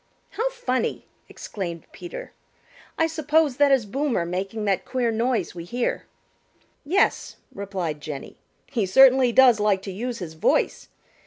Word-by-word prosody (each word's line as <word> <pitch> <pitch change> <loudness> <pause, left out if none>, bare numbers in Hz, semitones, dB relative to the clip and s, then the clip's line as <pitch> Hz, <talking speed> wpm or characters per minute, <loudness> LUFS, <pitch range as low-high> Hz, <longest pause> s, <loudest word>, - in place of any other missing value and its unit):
"How 470 +3 -1
funny!" 260 - -2 0.2
exclaimed 170 -5 -6
Peter. - - -8 0.7
"I 325 - +3
suppose 310 -3 +1
that 285 -1 +4
is 265 -5 +3
Boomer 255 -4 -1
making 195 +5 -3
that 195 -2 +1
queer 245 -3 -1
noise 225 -4 -1
we 170 -1 -7
hear." 240 +8 -3 0.8
"Yes," 370 +8 +1 0.2
replied 185 -7 -4
Jenny. 145 -2 -7 0.3
"He 235 -7 -2
certainly 260 +4 +6
does 245 -2 +6
like 205 -2 +1
to 195 - -5
use 235 +5 -4
his 175 -6 -7
voice. 160 - 0
235 Hz, 140 wpm, -24 LUFS, 190-270 Hz, 0.8 s, certainly